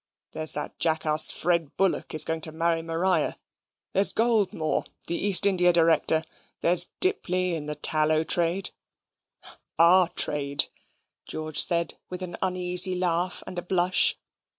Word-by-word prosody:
There 155 - -5
is - - +2
that - - -6
jackass 155 -1 +2
Fred 170 -3 -2
Bullock 195 -4 -1
is 155 - +5
going 160 0 -4
to 160 - -1
marry 165 +1 0
Maria 165 +3 -1 0.6
there's 195 +1 +3
Goldmore, 215 -9 0 0.2
the - - -3
East 200 +1 +4
India 180 -3 +3
Director, 165 -1 +2 0.4
there's 175 +1 +3
Dipley, 185 - -1
in 150 -3 -5
the 150 - -4
tallow 155 +1 +1
trade 175 +3 -1 1.1
OUR 175 +2 +5
trade," 145 -4 0 0.6
George 155 -1 -3
said, 170 -1 +2
with 185 0 -6
an 175 -1 -6
uneasy 180 0 +1
laugh 180 0 -2
and 180 - -6
a - - -5
blush. 180 0 +2
175 Hz, 140 wpm, -25 LUFS, 160-185 Hz, 1.1 s, is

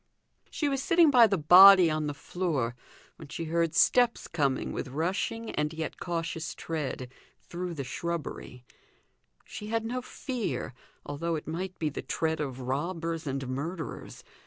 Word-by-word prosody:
She 300 - -2
was 275 -1 -1
sitting 335 0 +4
by 240 -4 +7
the 195 -2 0
body 180 +2 +8
on 155 -1 -1
the 145 - -4
floor 145 -7 -2 0.4
when 155 - -11
she 150 +3 -5
heard 165 0 0
steps 245 -2 +3
coming 140 -5 -1
with - - -4
rushing 185 - -2
and 150 0 -1
yet 160 0 -5
cautious 165 -1 -3
tread, 140 -6 -4 0.3
through 175 0 -5
the 140 - -4
shrubbery; 140 -3 -5 0.8
she 210 - -8
had 225 +1 -1
no 250 +2 -3
fear, 245 - -4 0.3
although 165 +3 -2
it 155 - -6
might 180 +3 -4
be 155 - -1
the 145 - -6
tread 160 -1 -2
of 135 -3 -4
robbers 165 +4 -3
and 135 -1 -3
murderers. 155 +6 -5
165 Hz, 155 wpm, -28 LUFS, 145-185 Hz, 0.8 s, body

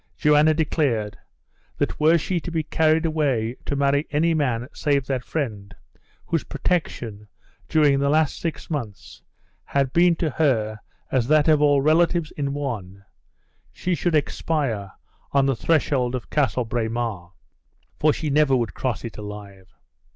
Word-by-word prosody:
Joanna 150 0 +4
declared, 140 -9 0 0.6
that - - -2
were 160 +2 +5
she 175 +2 -1
to 175 - -7
be 165 -2 -1
carried 160 +1 +2
away 135 -7 0
to 140 - -1
marry 140 +1 +1
any 160 +3 +2
man 125 -6 0
save 140 -3 0
that 130 -2 -2
friend, 105 - -4 0.5
whose 165 -3 -1
protection, 115 - -3 0.4
during 145 -3 +4
the 140 0 +1
last 155 0 +2
six 165 -2 -4
months, 120 - -6 0.4
had 135 -2 -1
been 170 0 +4
to 160 -2 -1
her 110 -8 0 0.3
as 125 -3 +1
that 155 +1 +4
of 155 -2 +4
all 145 -2 +4
relatives 165 +1 +2
in 140 -2 -3
one, 105 -9 -5 0.7
she 180 - -2
should 170 -1 0
expire 135 -9 -1 0.4
on 140 -1 +4
the 135 -1 +1
threshold 130 -2 +1
of 125 - -7
Castle 125 -4 +1
Braemer, 110 -6 -3 0.7
for 155 - +4
she 150 0 -3
never 145 -2 +4
would 115 -7 -1
cross 125 -2 -3
it 115 - -7
alive! 100 -2 -9
140 Hz, 150 wpm, -23 LUFS, 115-155 Hz, 0.7 s, were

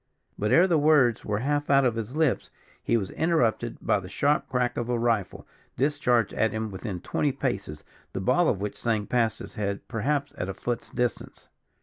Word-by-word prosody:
But 105 +1 -1
ere 170 - +7
his 190 - +1
words 145 -7 +4
were 105 -1 -1
half 145 +5 -1
out 140 -1 +5
of 120 - +2
his 115 +3 -5
lips, 155 -4 +1 0.3
he 115 - +2
was 95 -4 -3
interrupted 120 -8 +1
by - - +2
the 90 -1 -9
sharp 145 +9 +1
crack 125 -1 0
of 120 0 -3
a 120 - +1
rifle, 115 -4 -1 0.3
discharged 125 -5 +1
at 110 -1 +1
him 110 0 -3
within 95 -2 -5
twenty 145 +8 0
paces, 100 - -3 0.3
the - - -4
ball 130 - +3
of 95 - 0
which 105 0 -4
sang 110 -3 0
past 115 -2 +1
his - - -9
head, 100 -3 -3
perhaps 140 +5 -1
at 95 - -2
a 95 - -4
foot's 120 +4 -4
distance. 125 -2 -3
120 Hz, 200 wpm, -26 LUFS, 105-140 Hz, 0.3 s, ere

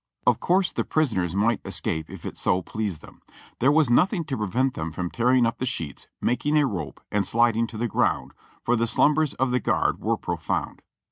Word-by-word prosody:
Of - - +3
course 185 +1 +2
the - - -1
prisoners 95 - 0
might 110 +3 +2
escape 80 0 -2
if - - -10
it - - -5
so 90 0 +1
pleased 100 -7 -4
them; - - -15 0.4
there 135 +4 +4
was 150 -5 +3
nothing 180 - +3
to 145 -4 -4
prevent 120 +6 0
them 80 +1 -4
from 90 +2 -4
tearing 125 +1 +3
up 115 0 -2
the 130 - -1
sheets, 80 - -5
making 145 +5 +1
a 150 - +4
rope 85 - -4
and 105 -1 +1
sliding 115 +2 +2
to 115 - -9
the 120 +2 -1
ground, - - 0 0.3
for 120 - +2
the 115 0 +1
slumbers 150 +5 +2
of 130 -1 0
the 125 - +2
guard - - 0
were - - 0
profound. - - -3
115 Hz, 205 wpm, -25 LUFS, 100-135 Hz, 0.4 s, there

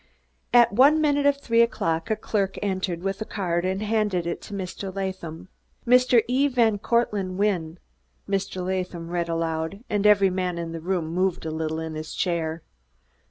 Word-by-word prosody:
At 240 -3 +6
one 280 +7 +6
minute 290 -2 +2
of 285 -1 +3
three 230 -4 +2
o'clock 165 -6 0
a 220 - +2
clerk 200 -2 -2
entered 185 -3 -2
with 195 +2 -2
a - - +1
card, 175 -5 -2
and 190 +2 -1
handed 210 -5 0
it 170 - -3
to 210 - -10
Mr. 190 0 -5
Latham. 185 -4 -5 0.4
"'Mr. 250 -1 +5
E. 260 +4 +2
van 230 -6 +2
Cortlandt 210 -4 0
Wynne,'" 180 -5 0 0.5
Mr. 195 -2 -2
Latham 180 -2 -3
read 170 -1 -1
aloud, 165 +4 -2
and 205 0 +2
every 200 -2 +5
man 180 -1 -2
in 170 -1 -4
the 165 -1 -6
room 180 -1 -1
moved 180 +2 -1
a 160 - -2
little 160 0 -2
in 160 -1 -5
his 155 0 -6
chair. 165 -2 -1
190 Hz, 175 wpm, -25 LUFS, 170-215 Hz, 0.5 s, At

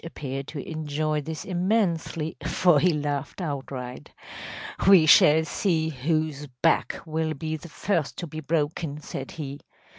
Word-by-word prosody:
‚ÄĚ - - -34
Simeonovitch 165 - -9
appeared 135 -1 -4
to 145 -3 -6
enjoy 155 -1 -1
this 155 +1 -6
immensely, 175 -4 0
for 175 -5 +4
he 180 +4 +4
laughed 145 -1 -3
outright. 135 -6 -5 0.8
“We 185 -5 +8
shall 155 +1 +7
see 160 -2 0
whose 155 +1 -1 0.2
back 165 - +2
will 160 0 -1
be 155 +2 -3
the 165 +2 -9
first 160 +2 -1
to 175 - -4
be 155 -1 -7
broken,‚ÄĚ 155 0 -2
said 135 -2 -6
he. 145 -3 -6
155 Hz, 150 wpm, -26 LUFS, 145-165 Hz, 0.8 s, We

